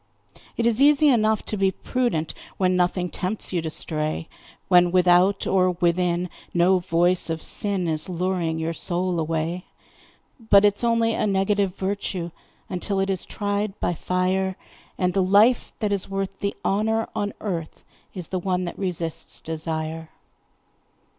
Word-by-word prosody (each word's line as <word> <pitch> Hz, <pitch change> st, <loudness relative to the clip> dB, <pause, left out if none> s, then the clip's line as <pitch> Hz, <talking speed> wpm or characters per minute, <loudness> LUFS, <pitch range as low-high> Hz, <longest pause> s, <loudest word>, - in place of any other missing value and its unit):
It 230 Hz, -, 0 dB
is 235 Hz, +2 st, +2 dB
easy 295 Hz, +1 st, +6 dB
enough 220 Hz, -4 st, +2 dB
to -, -, -3 dB
be 195 Hz, -1 st, +2 dB
prudent 190 Hz, -5 st, -2 dB, 0.2 s
When 185 Hz, -1 st, +2 dB
nothing 180 Hz, 0 st, +1 dB
tempts 185 Hz, +3 st, -3 dB
you 175 Hz, -, +1 dB
to 160 Hz, -, -3 dB
stray, 155 Hz, 0 st, -2 dB, 0.4 s
When 180 Hz, -1 st, +5 dB
without 180 Hz, +2 st, +4 dB
or 185 Hz, -1 st, +2 dB
within 175 Hz, 0 st, +1 dB, 0.3 s
no 180 Hz, +2 st, +4 dB
voice 175 Hz, 0 st, +1 dB
of 160 Hz, 0 st, -3 dB
sin 195 Hz, -4 st, 0 dB
Is 155 Hz, +2 st, 0 dB
luring 175 Hz, -2 st, -1 dB
your 160 Hz, +1 st, -2 dB
soul 175 Hz, +1 st, 0 dB
away; 165 Hz, +2 st, -2 dB, 0.7 s
But 210 Hz, -3 st, +5 dB
it's 205 Hz, +2 st, +2 dB
only 230 Hz, -1 st, +2 dB
a -, -, 0 dB
negative 195 Hz, -1 st, +1 dB
virtue 190 Hz, -3 st, -3 dB, 0.4 s
Until 195 Hz, +1 st, -2 dB
it 195 Hz, 0 st, +1 dB
is 190 Hz, -, -2 dB
tried 205 Hz, 0 st, -3 dB
by -, -, 0 dB
fire, 185 Hz, +2 st, -1 dB, 0.4 s
And 180 Hz, -1 st, 0 dB
the 195 Hz, -, +2 dB
life 205 Hz, +6 st, +4 dB
that 210 Hz, -2 st, -1 dB
is 200 Hz, -1 st, -1 dB
worth 195 Hz, 0 st, -4 dB
the 200 Hz, -, -2 dB
honour 220 Hz, +3 st, +1 dB
on 205 Hz, 0 st, -2 dB
earth 170 Hz, -6 st, -5 dB, 0.3 s
Is 180 Hz, -4 st, -6 dB
the 185 Hz, -, -2 dB
one 180 Hz, 0 st, -1 dB
that 175 Hz, -, -7 dB
resists 175 Hz, -4 st, -3 dB
desire. 160 Hz, 0 st, -4 dB
185 Hz, 155 wpm, -24 LUFS, 175-200 Hz, 0.7 s, easy